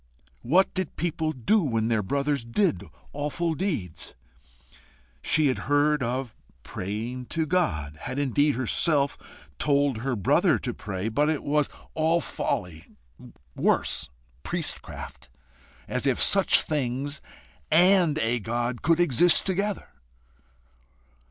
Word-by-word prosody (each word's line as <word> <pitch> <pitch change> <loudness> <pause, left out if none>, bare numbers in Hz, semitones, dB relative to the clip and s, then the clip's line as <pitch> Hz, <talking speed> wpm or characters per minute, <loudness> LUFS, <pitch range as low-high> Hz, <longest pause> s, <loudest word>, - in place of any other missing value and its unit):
What 175 +10 +3
did 185 -4 -3
people 160 -1 -1
do 155 - +2
when 115 -8 0
their 115 -2 +1
brothers 140 +5 -1
did 160 - 0 0.3
awful 150 +3 -2
deeds? 150 - -4 1.1
She 155 -1 +3
had 130 -3 +1
heard 145 0 +3
of 125 -1 -2 0.3
praying 115 +6 -5
to 160 -1 -1
God 80 - -1
had 130 - -5
indeed 145 +1 +2
herself 140 +3 +1 0.4
told 140 -4 +2
her 130 +1 -2
brother 100 - +3
to - - -4
pray, 95 0 -5
but 145 +7 +1
it 155 -2 -1
was 150 0 +1 0.2
all 160 +2 +2
folly 85 - -3 0.7
worse, 75 - +1 0.3
priestcraft. 170 - -4 0.6
As - - -2
if - - +1
such - - +5
things 140 0 -3 0.5
AND 175 -1 +4
a 120 -4 0
God 120 +2 -3
could 165 +4 +2
exist 175 +1 +4
together! 195 +1 -2
145 Hz, 120 wpm, -26 LUFS, 120-160 Hz, 1.1 s, such